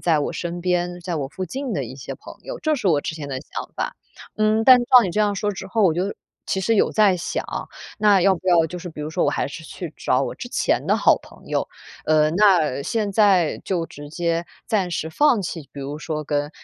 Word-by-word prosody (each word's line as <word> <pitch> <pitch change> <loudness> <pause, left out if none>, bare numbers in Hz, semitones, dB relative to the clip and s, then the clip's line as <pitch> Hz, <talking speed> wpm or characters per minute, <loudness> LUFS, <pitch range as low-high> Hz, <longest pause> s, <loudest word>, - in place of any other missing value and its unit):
在 165 -3 +2
我 - - -2
身 175 0 -4
边， 175 0 -1
在 175 0 -4
我 140 -3 -2
附 185 - -5
近 260 +6 -4
的 140 - -1
一 120 - -8
些 135 - -7
朋 - - -12
友， - - -6
这 310 -1 +1
是 225 - -3
我 150 -4 +3
之 160 - -4
前 145 -2 -6
的 135 - -3
想 - - -7
法。 - - -3 0.4
嗯， 215 +1 +2
但 255 -1 +9
是 240 - -1
照 250 0 +7
你 185 - -1
这 210 - 0
样 205 -1 +2
说 205 +1 -1
之 195 -1 -7
后， 215 +3 0
我 175 -5 +4
就 185 +4 -1 0.3
其 190 - -1
实 225 +4 +2
有 - - +3
在 205 -4 +4
想， 175 - -3 0.6
那 205 -2 +5
要 190 +1 +4
不 185 +1 -11
要 165 -2 +5
就 180 +2 -7
是 175 0 -7
比 150 - -9
如 150 - -4
说 160 - 0
我 - - +2
还 - - -1
是 160 +2 -9
去 165 -1 -8
找 - - +1
我 - - -3
之 - - -7
前 - - 0
的 - - +3
好 - - +4
朋 - - -17
友。 - - -1 0.4
呃， 155 -1 +4
那 175 -8 +3
现 210 +6 -1
在 190 -6 +4
就 170 -4 -1
直 145 0 -11
接 170 +1 -1 0.2
暂 195 -5 0
时 165 -2 -2
放 245 - +3
弃， 165 -6 -6
比 140 - -8
如 145 +2 -5
说 155 0 -4
跟， 145 0 -1
175 Hz, 265 characters per minute, -22 LUFS, 155-205 Hz, 0.6 s, 但